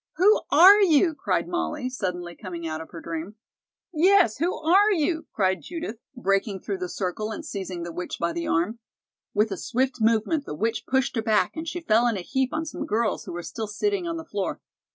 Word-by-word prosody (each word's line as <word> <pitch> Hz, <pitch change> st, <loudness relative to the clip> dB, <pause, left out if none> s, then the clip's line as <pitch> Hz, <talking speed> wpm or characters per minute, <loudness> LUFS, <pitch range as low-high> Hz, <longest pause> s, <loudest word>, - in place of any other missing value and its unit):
"Who 410 Hz, +5 st, +5 dB
are 375 Hz, +8 st, +8 dB
you?" 330 Hz, -2 st, +4 dB
cried -, -, -1 dB
Molly, 330 Hz, -6 st, -2 dB
suddenly 180 Hz, -8 st, -4 dB
coming 175 Hz, -4 st, -7 dB
out 155 Hz, 0 st, -4 dB
of 160 Hz, -, -10 dB
her 165 Hz, -, -9 dB
dream. 165 Hz, +5 st, -5 dB, 0.6 s
"Yes, 355 Hz, -, +4 dB
who 340 Hz, +5 st, 0 dB
are 385 Hz, +7 st, +4 dB
you?" 320 Hz, -2 st, 0 dB
cried 190 Hz, -2 st, +1 dB
Judith, 325 Hz, -10 st, -6 dB, 0.2 s
breaking 195 Hz, -3 st, 0 dB
through 200 Hz, -3 st, -4 dB
the 180 Hz, -1 st, -4 dB
circle 195 Hz, +4 st, -3 dB
and 305 Hz, +8 st, -6 dB
seizing 190 Hz, -, -5 dB
the 170 Hz, -1 st, -6 dB
witch 180 Hz, +2 st, -5 dB
by 170 Hz, 0 st, 0 dB
the 170 Hz, -, -3 dB
arm. 180 Hz, +8 st, 0 dB, 0.6 s
With 210 Hz, +1 st, +2 dB
a 195 Hz, -, -3 dB
swift 255 Hz, +3 st, -1 dB
movement 230 Hz, +7 st, +2 dB
the -, -, -5 dB
witch 225 Hz, +8 st, -2 dB
pushed 265 Hz, 0 st, +1 dB
her -, -, +2 dB
back 220 Hz, -1 st, +1 dB
and 320 Hz, 0 st, -5 dB
she 350 Hz, +1 st, -4 dB
fell 235 Hz, -4 st, +3 dB
in 230 Hz, -4 st, 0 dB
a -, -, -4 dB
heap 265 Hz, +6 st, -1 dB
on 315 Hz, +1 st, -2 dB
some 315 Hz, -, -5 dB
girls 220 Hz, -1 st, 0 dB
who -, -, -7 dB
were 175 Hz, 0 st, -5 dB
still 220 Hz, +3 st, -5 dB
sitting 360 Hz, -, -1 dB
on 335 Hz, 0 st, -3 dB
the 325 Hz, -, -7 dB
floor. 205 Hz, -10 st, -3 dB
230 Hz, 215 wpm, -25 LUFS, -, 0.6 s, are